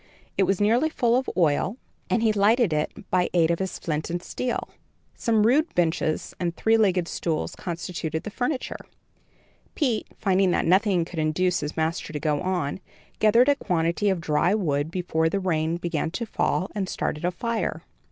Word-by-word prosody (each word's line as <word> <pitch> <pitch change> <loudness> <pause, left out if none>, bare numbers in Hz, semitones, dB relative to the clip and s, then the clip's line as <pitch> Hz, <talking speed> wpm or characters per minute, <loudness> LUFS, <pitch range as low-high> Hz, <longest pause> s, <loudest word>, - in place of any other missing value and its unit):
It 195 - +3
was 195 -1 +1
nearly 235 +9 +3
full 240 -6 +2
of 260 +1 0
oil, 175 - +2 0.3
and 230 - +1
he 220 -1 +3
lighted 210 -1 +3
it 150 0 0 0.2
by 180 -1 +2
aid 165 -1 +4
of 170 - 0
his 190 -1 -3
flint 155 -1 -3
and 175 +1 -2
steel. 250 +5 -3 0.5
Some 220 -2 +2
rude 295 +8 +2
benches 160 -2 0
and 170 -1 -1
three 225 0 +3
legged 190 -6 +2
stools 160 -3 -2
constituted 165 -2 -4
the 210 - -6
furniture. 255 +4 -2 1.0
Pete, 250 -8 0
finding 190 -1 +2
that - - +1
nothing 185 -1 +3
could 170 -1 -6
induce 175 +4 +1
his 150 +2 -5
master 160 0 -1
to 150 - -2
go 150 -1 0
on, 180 -5 -1 0.4
gathered 230 +4 +5
a - - +6
quantity 170 -2 0
of 190 -2 0
dry 170 +5 +2
wood 150 -7 0
before 165 -2 0
the 200 - -1
rain 165 -3 0
began 170 -2 -2
to 235 +8 -4
fall, 190 -3 -1
and 195 -3 -2
started 150 - -3
a 175 - +2
fire. 230 +5 -3
180 Hz, 180 wpm, -25 LUFS, 165-215 Hz, 1.0 s, a